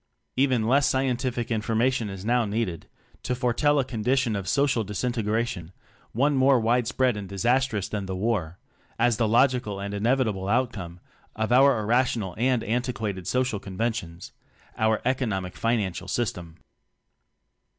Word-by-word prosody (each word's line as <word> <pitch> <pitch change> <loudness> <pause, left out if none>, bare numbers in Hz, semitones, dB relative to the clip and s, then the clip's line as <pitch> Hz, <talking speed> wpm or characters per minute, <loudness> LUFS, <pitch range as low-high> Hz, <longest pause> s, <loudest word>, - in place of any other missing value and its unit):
Even 130 -5 +2
less 135 +3 +4
scientific 125 -2 -1
imagination 115 +1 0
is 95 0 -8
now 120 +1 +2
needed 105 -5 -3 0.3
to 125 - -2
foretell 125 +4 +1
a 135 - +2
condition 125 0 0
of 95 -2 -4
social 140 -1 +2
disintegration, 110 -4 -2 0.4
one 140 +6 +2
more 130 -1 +4
wide 120 +1 +1
spread 125 -1 +1
and 100 -2 -6
disastrous 120 +1 0
than 100 -2 -4
the 95 - -3
War, 95 -5 -1 0.4
as 120 -1 +2
the 115 - +1
logical 120 -3 +2
and 100 +1 -5
inevitable 110 -3 0
outcome 105 -8 -1 0.3
of 110 +1 -2
our 135 -1 +5
irrational 115 -3 0
and 125 -1 +2
antiquated 110 -6 -2
so 130 0 +2
cial 110 -6 -3
conventions 95 -4 -4 0.4
our 110 0 +1
"economic 110 -8 -1
and - - -16
financial 105 -5 -1
system." 90 -6 -3
115 Hz, 140 wpm, -26 LUFS, 100-125 Hz, 0.4 s, our